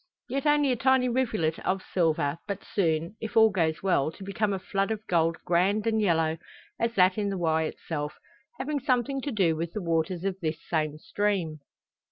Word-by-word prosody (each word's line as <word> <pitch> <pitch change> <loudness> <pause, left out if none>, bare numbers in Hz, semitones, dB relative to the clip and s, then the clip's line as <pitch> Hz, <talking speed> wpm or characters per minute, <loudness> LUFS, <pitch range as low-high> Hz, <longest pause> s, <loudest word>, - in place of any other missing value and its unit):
Yet 275 +3 -1
only 295 -2 +4
a - - +2
tiny 260 +1 +3
rivulet 220 -11 0
of 190 0 -1
silver, 160 -3 +1
but 200 - -4
soon, 165 0 0
if 225 0 -4
all 220 -1 +7
goes 165 -4 0
well, 160 -6 +2
to 195 - -11
become 200 +2 -1
a 195 - 0
flood 195 +1 -1
of 220 -1 -3
gold 165 -3 +2
grand 190 +5 +2
and 220 -1 +2
yellow 165 -4 +1 0.4
as 230 0 0
that 185 +2 +4
in 205 -1 0
the 195 - -2
Wye 160 -2 +1
itself, 150 -1 -5 0.4
having 285 +2 -2
something 265 0 0
to 285 - -3
do 185 -8 +2
with 165 +1 -4
the 210 - -3
waters 170 +2 0
of 195 -1 -2
this 160 -3 -2
same 155 -2 -1
stream. 180 -3 -1
190 Hz, 195 wpm, -27 LUFS, 165-220 Hz, 0.4 s, all